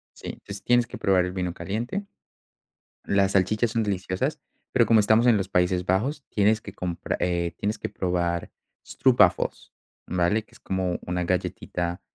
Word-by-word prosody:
Sí, - - -7 0.3
tienes 120 0 +4
que - - -8
probar 95 -2 +3
el 90 - -3
vino 90 -2 -2
caliente. 120 - -3 1.0
Las 100 -1 +2
salchichas 105 +4 +2
son 115 -1 +1
deliciosas, 95 -2 -2 0.3
pero - - +4
como 115 -1 +6
estamos 110 +3 +4
en 115 -3 +6
los 95 - -2
Países 90 -1 +1
Bajos, 130 +11 0
tienes 110 +1 +2
que 100 - -9
compra 90 -4 -3
eh, 85 -1 0
tienes 105 +2 -2
que - - -4
probar 85 -2 -1 0.3
stroopwafels, - - +2 0.3
¿vale?, 90 +5 +1
que - - -30
es - - -18
como 95 -2 -2
una 90 0 -1
galletita, 90 0 -2
95 Hz, 160 wpm, -25 LUFS, 90-110 Hz, 1.0 s, como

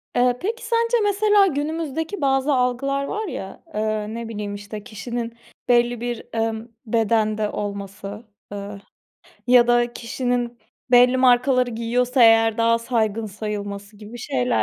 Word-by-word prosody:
Eee, 245 0 +3
peki, 460 +6 -3
sence, 465 +1 +2
mesela, 410 0 +4
günümüzdeki 320 +3 -3
bazı 270 +1 +2
algılar 265 +2 0
var 425 +7 -3
ya, 195 - -7
eee, 215 0 -2
ne 230 0 -5
bileyim, 205 -2 -5
işte, 205 +1 -8
kişinin 235 +1 -5 0.4
belli 240 -1 +3
bir, 240 -1 -3 0.2
ımm, 225 +1 -2
bedende 215 -1 +1
olması, 200 +1 -6 0.3
ııı, 200 0 -7 0.7
ya 245 -1 +6
da 240 0 +2
kişinin, 245 0 -2 0.3
belli 250 +1 +6
markaları 255 0 +4
giyiyorsa 245 +3 +1
eğer 225 0 +5
daha 230 0 +3
saygın 225 -2 -1
sayılması 205 0 -6
gibi 215 +3 -10
şeyler. 125 - 0
235 Hz, 130 wpm, -22 LUFS, 215-255 Hz, 0.7 s, ya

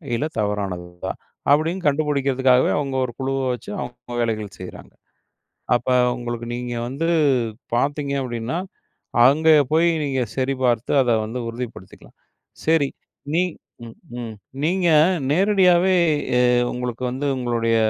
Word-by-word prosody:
இல்ல 115 - -1
தவறானதா, 95 -3 -3 0.4
அப்டின்னு 165 +5 +2
கண்டுபிடிக்கிறதுக்காகவே 135 -3 +2
அவங்க 140 -2 -2
ஒரு 120 - -6
குழுவை 135 0 -1
வச்சு 120 - -8
அவங்க 120 0 -7
வேலைகள் 110 -3 -3
செய்றாங்க. 90 - -10 0.8
அப்ப 120 +1 -1 0.3
உங்களுக்கு 120 -1 -5
நீங்க 120 0 -4
வந்து 140 +6 -2 0.7
பார்த்தீங்க 140 +3 0
அப்டின்னா, 120 +4 -3 0.7
அங்கே 160 +4 +5 0.2
போய் 165 +2 +4 0.2
நீங்க 135 -2 0
சரிபார்த்து 130 -3 0
அத 125 - 0
வந்து 115 +4 -5
உறுதிப்படுத்திக்கலாம். 115 -5 -9 0.5
சரி 160 -3 +3 0.5
நீ 175 - +3 0.4
ம், 115 - -11 0.2
ம். 115 -2 -6 0.3
நீங்க 180 +3 +1 0.4
நேரடியாவே 185 +1 +4 0.4
அ - - +4 0.3
உங்களுக்கு 125 -1 -4
வந்து 135 +3 -3
உங்களுடைய 120 -2 0
130 Hz, 115 wpm, -22 LUFS, 120-145 Hz, 0.8 s, அங்கே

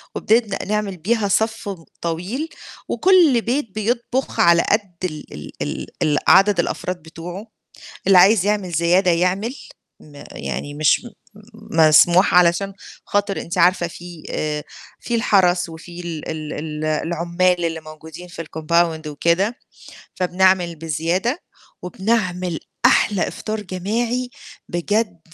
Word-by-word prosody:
وبنبدأ 220 -3 +1
نعمل 205 -2 -2
بيها 210 +4 0
صف 220 +1 0 0.3
طويل، 185 - -3 0.4
وكُل 340 -11 +4
بيت 235 -3 -2
بيطبخ 240 +4 -2
على 170 0 +6
قد 200 -4 0
ال 155 -4 -5
ال 75 - -9
ال - - -4 0.2
ال 150 -1 +2
عدد 195 -1 +5
الأفراد 180 +1 -2
بتوعه، 175 +6 -8 0.6
اللي 195 -2 +7
عايز 195 +1 +5
يعمل 205 -4 0
زيادة 175 +3 +3
يعمل 185 +8 0 0.5
م 145 -2 -13
يعني 145 0 -5
مش 155 +10 +2
م - - -8 0.7
م - - -1
مسموح 175 +5 +5
علشان 180 +3 +3 0.3
خاطر 200 -4 0
أنتِ 170 +2 -5
عارفة 175 0 +4
في 175 -1 -11
آآ 150 -1 -2 0.4
في 240 - -4
الحرس 180 -6 +3
وفي 170 +2 -10
ال 165 -3 -6
ال 155 -1 -5
ال 150 0 -5
العُمال 170 +3 0
اللي 165 -1 -2
موجودين 155 +3 -11
في 170 -1 -7
الCompound 160 0 0
وكده 170 - 0 0.6
فبنعمل 180 -1 +2
بزيادة 165 - -1 0.4
وبنعمل 185 -3 -1 0.3
أحلى 200 -4 +3
إفطار 215 0 -5
جماعي 230 +7 -2 0.4
بجد 205 +1 -1
180 Hz, 125 wpm, -20 LUFS, 165-210 Hz, 0.7 s, اللي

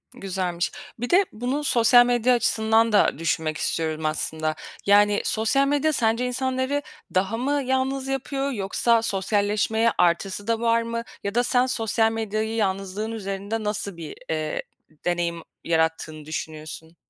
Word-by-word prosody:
Güzelmiş. 180 -2 -2 0.3
Bir 245 - -3
de 380 +3 +5
bunu 250 +7 -2
sosyal 245 -1 +6
medya 245 0 +3
açısından 225 -1 +2
da 210 - +3
düşünmek 160 -1 -1
istiyorum 160 -1 -2
aslında. 155 0 -1 0.3
Yani, 205 0 +5
sosyal 250 +6 +2
medya 290 +2 +2
sence 230 0 +1
insanları 260 +3 -1 0.3
daha 195 +4 +1
mı 280 +3 0
yalnız 265 +1 0
yapıyor 270 +1 -2
yoksa 225 +2 +1
sosyalleşmeye 210 +2 +1
artısı 190 +4 +1
da 230 -1 +1
var 230 0 +2
mı? 230 0 -3 0.2
Ya 200 +2 -3
da 245 - +3
sen 250 +1 +2
sosyal 225 -2 +1
medyayı 220 0 -2
yalnızlığın 195 +1 -2
üzerinde 200 +1 -4
nasıl 200 -3 -3
bir, 160 -3 -7
eee, 155 -1 -2 0.4
deneyim 170 -1 -1 0.2
yarattığını 160 -2 -1
düşünüyorsun? 155 +1 -7
220 Hz, 135 wpm, -24 LUFS, 180-245 Hz, 0.4 s, sosyal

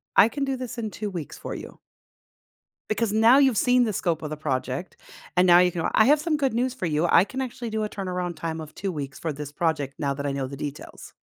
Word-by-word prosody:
I 220 - +7
can 275 +3 -2
do 270 -1 -1
this 250 -1 -6
in 220 -2 -3
2 210 -1 -4
weeks 170 -6 -6
for - - -6
you." - - -9 1.1
Because 215 0 0
now 225 +5 +6
you've 265 -5 +4
seen 250 +2 +4
the 220 -3 -1
scope 170 -4 -1
of 155 - -5
the 155 - -5
project, 135 +2 -3 0.4
and 180 +1 +4
now 175 -1 +8
you 180 0 +4
can 170 - -3
go, - - 0
"I 220 - +6
have 295 +2 +5
some 310 -2 0
good 270 -5 0
news 245 +2 0
for 185 - -3
you, 155 +1 +1
I - - +6
can 260 +6 -5
actually 245 -2 -5
do 220 0 -1
a 210 - -2
turnaround 180 -4 -4
time 160 -1 -4
of 155 -1 -10
2 195 -1 -3
weeks 140 -4 -6
for 160 -2 -3
this 145 0 -7
project 145 -4 -1
now 140 -1 0
that 140 +1 -5
I - - 0
know 135 -1 -2
the 140 +1 -8
details." 145 0 -8
180 Hz, 260 wpm, -25 LUFS, 150-235 Hz, 1.1 s, now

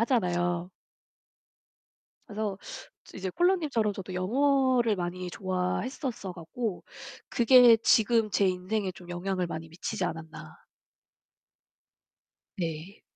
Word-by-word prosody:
하잖아요. 175 -7 +1 1.6
그래서 205 -2 -3 0.6
이제 190 -1 -4
콜로 355 - +3
님처럼 235 - 0
저도 190 -1 -7
영어를 255 +2 +2
많이 180 0 -4
좋아했었어 190 - -3
갖고 180 +5 -5 0.5
그게 240 -1 +7
지금 225 -1 +3
제 200 - +2
인생에 185 +2 -2
좀 175 -1 -14
영향을 180 +1 -2
많이 165 -1 -6
미치지 165 +3 -4
않았나. 160 0 -7 2.0
네. 165 +3 -5
195 Hz, 225 characters per minute, -28 LUFS, 180-230 Hz, 2.0 s, 그게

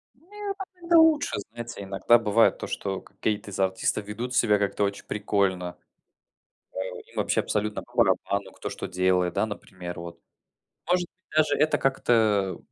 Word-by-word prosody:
Не, 400 +8 -6
так 385 -1 -7 0.2
это 340 0 +5
лучше, 320 -2 +4
знаете, 120 -2 -7
иногда 100 +4 +4
бывает 115 0 +3
то, - - -5
что 95 -1 -3
какие-то 105 -1 -3
из 95 - -6
артистов 95 +2 0
ведут 120 +4 -4
себя 105 -4 +4
как-то 100 0 0
очень 100 0 -2
прикольно. 95 -4 -1 1.0
А, - - -10
им 95 -1 -9
вообще - - +2
абсолютно 105 0 -2
по - - -22
барабану, 100 0 +1
кто, - - -6
что - - -5
делает, 90 -1 +1
да, - - +1
например 90 -5 -7
вот. 85 0 -8 0.7
Может 180 0 +3
быть, 185 - -53
даже 155 -2 +4
это 155 +1 +3
как-то, 110 -7 +2
105 Hz, 160 wpm, -26 LUFS, 95-135 Hz, 1.0 s, это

